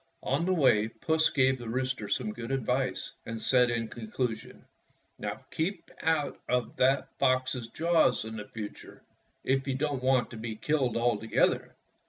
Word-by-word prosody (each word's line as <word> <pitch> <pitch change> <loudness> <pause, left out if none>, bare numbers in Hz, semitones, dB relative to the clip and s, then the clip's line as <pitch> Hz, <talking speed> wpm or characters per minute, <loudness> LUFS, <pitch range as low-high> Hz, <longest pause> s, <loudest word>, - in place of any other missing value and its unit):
On 170 - 0
the 185 - +2
way 110 -9 +4
Puss 160 +7 +1
gave 130 -2 +3
the 120 -2 -6
rooster 130 -3 -2
some 110 -5 -1
good 120 +1 -7
advice, 130 0 -1
and 115 0 -4
said 125 +1 +4
in 115 -1 -1
conclusion, 115 +1 -4 0.5
"Now, - - -5
keep 170 +3 -3
out 160 -2 0
of 125 -1 0
that 135 +2 +3
fox's 130 -3 +1
jaws 165 -2 +2
in 110 -1 -5
future, 105 -2 -8 0.4
if 135 +1 +1
you 135 - 0
don't 140 -1 -1
want 130 -1 +2
to 115 - -7
be 110 0 -4
killed 130 0 0
altogether." 115 -2 +1
130 Hz, 155 wpm, -29 LUFS, 115-135 Hz, 0.5 s, way